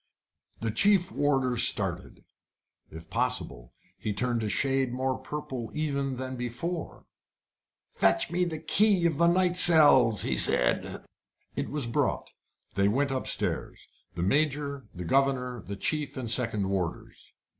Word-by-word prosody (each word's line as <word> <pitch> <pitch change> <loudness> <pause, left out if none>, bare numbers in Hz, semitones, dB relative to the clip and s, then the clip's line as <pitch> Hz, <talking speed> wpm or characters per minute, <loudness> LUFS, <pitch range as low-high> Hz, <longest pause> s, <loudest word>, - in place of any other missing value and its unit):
The 115 -1 -1
chief 195 - +2
warder 135 -4 0
started. 95 -6 0 0.6
If 80 +1 -12
possible, 120 - -2 0.3
he 105 - -3
turned 120 +2 -1
a 110 - -2
shade 135 +1 0
more 130 +1 -2
purple 130 -6 -6
even 140 -3 -2
than 130 0 -5
before. 125 +8 -5 0.9
"Fetch 95 +7 +1
me 180 +1 0
the 165 -2 -4
key 200 +1 +2
of 165 -3 0
the 170 - +4
night 180 +1 +2
cells," 145 - +6
he 65 - -1
said. - - +2 0.5
It - - -3
was 145 -3 -1
brought. 115 - -2 0.4
They 100 0 +2
went 135 +6 0
upstairs 130 -1 -2 0.3
the 85 - -3
Major, 140 +4 -1
the 90 -1 -8
governor, 125 0 0
the 100 - -5
chief 150 +9 -2
and 125 -2 -4
second 110 -4 0
warders. 90 -4 -5
130 Hz, 135 wpm, -27 LUFS, 110-150 Hz, 0.9 s, cells